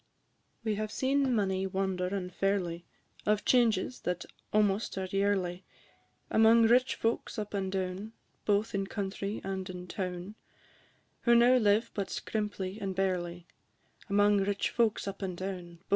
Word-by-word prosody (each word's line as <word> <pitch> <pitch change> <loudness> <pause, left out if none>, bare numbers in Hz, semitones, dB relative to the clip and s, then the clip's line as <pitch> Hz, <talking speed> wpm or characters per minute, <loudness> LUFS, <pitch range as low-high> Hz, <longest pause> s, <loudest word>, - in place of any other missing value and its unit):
We 220 -1 0
have 215 0 -3
seen 270 -1 +1
many 190 -2 +1
wonder 190 -1 -1
and 185 -1 -3
ferly, 180 -4 -1 0.4
Of 210 0 +2
changes 240 -2 +3
that 180 -1 -3 0.3
almost 210 0 +1
are 190 - -1
yearly, 190 -2 0 0.7
Among 225 +1 +6
rich 245 +3 +4
folks 230 +2 -1
up 210 -1 -4
and 190 -2 -1
down, 190 +3 -3 0.3
Both 210 +2 +1
in 195 -1 -1
country 200 +1 -3
and 190 -1 -4
in 180 -1 -6
town, 180 +1 -4 0.9
Who 235 -1 +5
now 245 +2 +6
live 220 0 +3
but 200 -2 -2
scrimply 205 -1 -3
and 195 -2 -3
barely; 180 -2 -1 0.6
Among 205 +1 +4
rich 200 +1 0
folks 225 -4 +1
up 195 +1 -5
and 185 -2 -3
down, 180 -2 -5
&c. - - -35
195 Hz, 145 wpm, -31 LUFS, 185-215 Hz, 0.9 s, Among